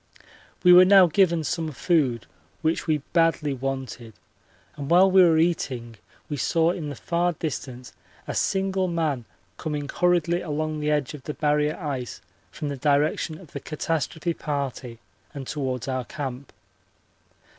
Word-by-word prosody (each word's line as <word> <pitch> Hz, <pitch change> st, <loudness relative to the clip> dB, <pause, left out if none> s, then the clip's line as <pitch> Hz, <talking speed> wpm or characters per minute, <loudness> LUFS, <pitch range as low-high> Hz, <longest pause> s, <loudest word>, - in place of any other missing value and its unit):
We 180 Hz, -1 st, +8 dB
were 180 Hz, +1 st, +10 dB
now 190 Hz, 0 st, +7 dB
given 170 Hz, -1 st, +2 dB
some 160 Hz, +1 st, -2 dB
food, 135 Hz, -, +1 dB, 0.4 s
which 160 Hz, +2 st, 0 dB
we 155 Hz, -3 st, +1 dB
badly 165 Hz, -4 st, +2 dB
wanted, 130 Hz, -3 st, -5 dB, 0.6 s
and 140 Hz, -2 st, -6 dB
while 185 Hz, +3 st, +6 dB
we 190 Hz, 0 st, +7 dB
were 165 Hz, -3 st, +5 dB
eating 130 Hz, -9 st, -1 dB, 0.3 s
we 145 Hz, -, -4 dB
saw 165 Hz, +5 st, +2 dB
in 165 Hz, -5 st, -5 dB
the 145 Hz, -, -6 dB
far 175 Hz, +6 st, 0 dB
distance 130 Hz, -5 st, -6 dB, 0.3 s
a -, -, -3 dB
single 190 Hz, -1 st, 0 dB
man 155 Hz, -8 st, -1 dB, 0.3 s
coming 150 Hz, -2 st, -4 dB
hurriedly 175 Hz, +1 st, +1 dB
along 155 Hz, 0 st, -3 dB
the 150 Hz, 0 st, -1 dB
edge 150 Hz, -2 st, 0 dB
of 150 Hz, -, -9 dB
the 150 Hz, -, -4 dB
Barrier 150 Hz, 0 st, +1 dB
ice 135 Hz, -, -5 dB, 0.3 s
from 150 Hz, -, -5 dB
the 140 Hz, -, -4 dB
direction 150 Hz, +3 st, +1 dB
of 165 Hz, -3 st, -15 dB
the 140 Hz, -, -5 dB
catastrophe 160 Hz, +3 st, -2 dB
party 140 Hz, -6 st, -4 dB, 0.4 s
and 135 Hz, -2 st, -6 dB
towards 130 Hz, -3 st, -3 dB
our 130 Hz, -2 st, -2 dB
camp. 135 Hz, -2 st, -6 dB
150 Hz, 150 wpm, -25 LUFS, 135-170 Hz, 0.6 s, were